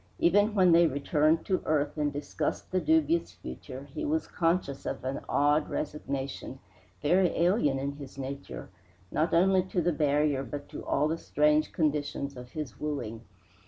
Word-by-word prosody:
Even 205 Hz, +5 st, +3 dB
when 185 Hz, -3 st, +5 dB
they 170 Hz, 0 st, +6 dB
returned 150 Hz, +3 st, +1 dB
to 185 Hz, -2 st, 0 dB
earth 145 Hz, -2 st, 0 dB
and 150 Hz, -1 st, 0 dB
discussed 145 Hz, 0 st, -3 dB
the 185 Hz, 0 st, +1 dB
dubious 320 Hz, +1 st, +2 dB
future, -, -, -9 dB
he -, -, -4 dB
was 315 Hz, +1 st, 0 dB
conscious 165 Hz, -5 st, -1 dB
of -, -, -4 dB
an 130 Hz, +1 st, -2 dB
odd 145 Hz, +1 st, +2 dB
resignation, 140 Hz, -3 st, -4 dB, 0.5 s
very 180 Hz, +5 st, +4 dB
alien 170 Hz, -5 st, +3 dB
in 140 Hz, +1 st, -2 dB
his 140 Hz, -2 st, -10 dB
nature, 140 Hz, +1 st, -6 dB, 0.4 s
not 160 Hz, +2 st, +1 dB
only 185 Hz, +2 st, +4 dB
to 185 Hz, 0 st, -2 dB
the 175 Hz, 0 st, +1 dB
barrier 145 Hz, -2 st, +2 dB
but 145 Hz, +3 st, -6 dB
to -, -, -7 dB
all 145 Hz, +2 st, +1 dB
the 165 Hz, +1 st, -2 dB
strange 150 Hz, +1 st, +2 dB
conditions 145 Hz, -3 st, -1 dB
of 125 Hz, 0 st, -11 dB
his 150 Hz, -8 st, -6 dB
wooing. 120 Hz, -7 st, -4 dB
150 Hz, 160 wpm, -29 LUFS, 140-175 Hz, 0.5 s, they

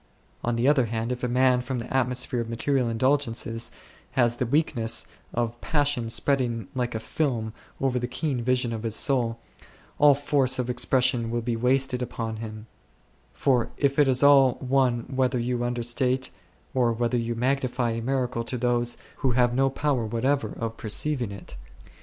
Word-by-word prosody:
On 120 Hz, 0 st, 0 dB
the 120 Hz, +3 st, +1 dB
other 140 Hz, -4 st, +4 dB
hand, 115 Hz, +2 st, -2 dB
if 125 Hz, 0 st, -4 dB
a -, -, +1 dB
man 125 Hz, 0 st, +3 dB
from 130 Hz, +1 st, -4 dB
the 120 Hz, +2 st, -5 dB
atmosphere 125 Hz, -1 st, 0 dB
of 115 Hz, -1 st, -3 dB
material 125 Hz, +2 st, 0 dB
indul 130 Hz, +5 st, +2 dB
gences 115 Hz, -2 st, -3 dB, 0.4 s
has 120 Hz, -2 st, +2 dB
the 125 Hz, -, -1 dB
weakness 120 Hz, -5 st, +1 dB, 0.3 s
of 120 Hz, 0 st, -3 dB
passion 145 Hz, -6 st, 0 dB
spreading 120 Hz, -4 st, 0 dB
like 125 Hz, -2 st, -2 dB
a -, -, -1 dB
film 110 Hz, -1 st, -2 dB, 0.3 s
over 130 Hz, -2 st, 0 dB
the 125 Hz, -, -2 dB
keen 135 Hz, -1 st, -2 dB
vision 125 Hz, -1 st, +1 dB
of 110 Hz, -, -4 dB
his 110 Hz, -1 st, -1 dB
soul, 120 Hz, -4 st, +1 dB, 0.6 s
all 145 Hz, -1 st, +7 dB
force 140 Hz, -2 st, +1 dB
of 125 Hz, -1 st, -1 dB
expression 125 Hz, -1 st, +1 dB
will 120 Hz, 0 st, -2 dB
be 120 Hz, 0 st, -1 dB
wasted 125 Hz, +2 st, +1 dB
upon 115 Hz, -2 st, -4 dB
him; 110 Hz, -1 st, -7 dB, 0.7 s
for 125 Hz, -4 st, +1 dB
it 140 Hz, -2 st, +2 dB
is 135 Hz, -2 st, +4 dB
all 135 Hz, -3 st, +6 dB
one 130 Hz, -2 st, +1 dB
whether 130 Hz, +1 st, -1 dB
you 120 Hz, 0 st, -1 dB
understate 120 Hz, +2 st, 0 dB, 0.4 s
or 125 Hz, -3 st, +2 dB
whether 120 Hz, +2 st, -1 dB
you 115 Hz, 0 st, -2 dB
magnify 125 Hz, -1 st, 0 dB
a 115 Hz, 0 st, -3 dB
miracle 125 Hz, -1 st, -1 dB
to 125 Hz, +2 st, -4 dB
those 120 Hz, 0 st, 0 dB, 0.2 s
who 130 Hz, -3 st, 0 dB
have 120 Hz, 0 st, +3 dB
no 135 Hz, +2 st, +2 dB
power 135 Hz, -2 st, 0 dB
whatever 115 Hz, +2 st, -1 dB
of 115 Hz, 0 st, -4 dB
perceiving 120 Hz, +2 st, 0 dB
it7. 100 Hz, -1 st, -10 dB
125 Hz, 170 wpm, -26 LUFS, 115-130 Hz, 0.7 s, all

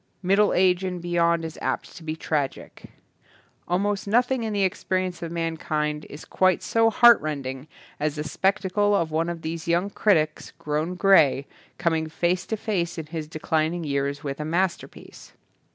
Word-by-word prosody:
Middle 200 Hz, +3 st, +3 dB
age 180 Hz, 0 st, +3 dB
and 180 Hz, -1 st, -3 dB
beyond 170 Hz, -1 st, +1 dB
is 160 Hz, -, -7 dB
apt -, -, -3 dB
to -, -, -11 dB
be 155 Hz, 0 st, -3 dB
tragic. 150 Hz, -4 st, -3 dB, 0.8 s
Almost 200 Hz, +3 st, -1 dB
nothing 245 Hz, +4 st, +2 dB
in 220 Hz, -1 st, -2 dB
the 200 Hz, -1 st, +1 dB
ex 185 Hz, -, -1 dB
perience 185 Hz, -2 st, -1 dB
of 165 Hz, -1 st, -5 dB
mankind 155 Hz, -2 st, -2 dB
is 145 Hz, -, -10 dB
quite 185 Hz, -2 st, +2 dB
so 225 Hz, 0 st, +3 dB
heart 235 Hz, +1 st, +6 dB
rending 140 Hz, -2 st, -5 dB, 0.3 s
as 150 Hz, 0 st, -1 dB
the 150 Hz, -, -3 dB
spectacle 200 Hz, +4 st, +1 dB
of 165 Hz, -5 st, 0 dB
one 165 Hz, +2 st, 0 dB
of 170 Hz, -1 st, -6 dB
these 160 Hz, +1 st, -5 dB
young 175 Hz, +4 st, +1 dB
critics, 155 Hz, -9 st, +1 dB
grown 155 Hz, +4 st, -2 dB
grey, 160 Hz, -8 st, +4 dB, 0.3 s
com 170 Hz, -2 st, +1 dB
ing 160 Hz, 0 st, -1 dB
face 175 Hz, +3 st, -1 dB
to 220 Hz, -, -2 dB
face 180 Hz, -6 st, -2 dB
in 160 Hz, -, -5 dB
his 155 Hz, 0 st, -6 dB
declining 160 Hz, +2 st, -1 dB
years 140 Hz, 0 st, -2 dB
with 140 Hz, -1 st, -4 dB
a -, -, -2 dB
masterpiece. 175 Hz, +4 st, -3 dB
170 Hz, 170 wpm, -25 LUFS, 155-190 Hz, 0.8 s, heart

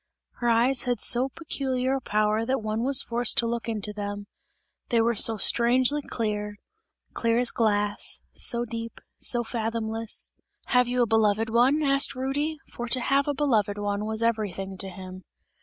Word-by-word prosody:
Her 240 Hz, -, 0 dB
eyes 240 Hz, +3 st, +3 dB
had 245 Hz, -3 st, -1 dB
so 250 Hz, +4 st, +3 dB
peculiar 265 Hz, -4 st, -2 dB
a 270 Hz, -, -1 dB
power 215 Hz, 0 st, 0 dB
that 255 Hz, -1 st, -1 dB
one 215 Hz, +1 st, -2 dB
was 275 Hz, +1 st, +4 dB
forced 235 Hz, 0 st, +1 dB
to 235 Hz, -, +3 dB
look 235 Hz, 0 st, -3 dB
into 210 Hz, -2 st, -3 dB
them; 205 Hz, 0 st, -5 dB, 0.6 s
they 235 Hz, -, +2 dB
were 230 Hz, +1 st, +2 dB
so 225 Hz, 0 st, +3 dB
strangely 250 Hz, +7 st, +3 dB
clear 210 Hz, -5 st, -4 dB, 0.6 s
clear 230 Hz, 0 st, 0 dB
as 245 Hz, 0 st, +1 dB
glass, 210 Hz, -2 st, 0 dB
so 240 Hz, 0 st, -1 dB
deep, 230 Hz, 0 st, -7 dB, 0.2 s
so 240 Hz, -1 st, 0 dB
fathomless 225 Hz, -1 st, -3 dB, 0.4 s
"Have 250 Hz, -1 st, +3 dB
you 245 Hz, 0 st, +1 dB
a -, -, +2 dB
beloved 220 Hz, 0 st, +1 dB
one?" 260 Hz, +6 st, +3 dB
asked 275 Hz, 0 st, +3 dB
Rudy; 285 Hz, +4 st, -2 dB, 0.2 s
for 240 Hz, -, -5 dB
to 255 Hz, +2 st, +2 dB
have 275 Hz, +3 st, +1 dB
a 290 Hz, -, -1 dB
beloved 220 Hz, -8 st, +1 dB
one 205 Hz, 0 st, -2 dB
was 220 Hz, +1 st, -2 dB
everything 205 Hz, -4 st, -2 dB
to 195 Hz, -, -2 dB
him. 185 Hz, 0 st, -10 dB
230 Hz, 170 wpm, -26 LUFS, 215-255 Hz, 0.6 s, was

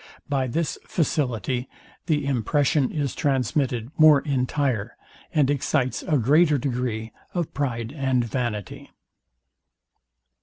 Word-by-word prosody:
By 135 Hz, -2 st, 0 dB
this 160 Hz, +6 st, -2 dB
facility 130 Hz, -5 st, -1 dB, 0.4 s
the 150 Hz, -3 st, +1 dB
impression 140 Hz, +2 st, +1 dB
is 145 Hz, -4 st, -2 dB
transmitted 130 Hz, -2 st, 0 dB
more 155 Hz, -2 st, +8 dB
entire, 130 Hz, -5 st, -1 dB, 0.3 s
and 150 Hz, -5 st, +3 dB
excites 130 Hz, -2 st, 0 dB
a 155 Hz, -5 st, +1 dB
greater 150 Hz, +5 st, +4 dB
degree 120 Hz, -4 st, -2 dB, 0.2 s
of 175 Hz, -3 st, -2 dB
pride 120 Hz, -3 st, -2 dB
and 130 Hz, -4 st, +1 dB
vanity. 110 Hz, -5 st, -4 dB
135 Hz, 105 wpm, -24 LUFS, 120-145 Hz, 0.4 s, more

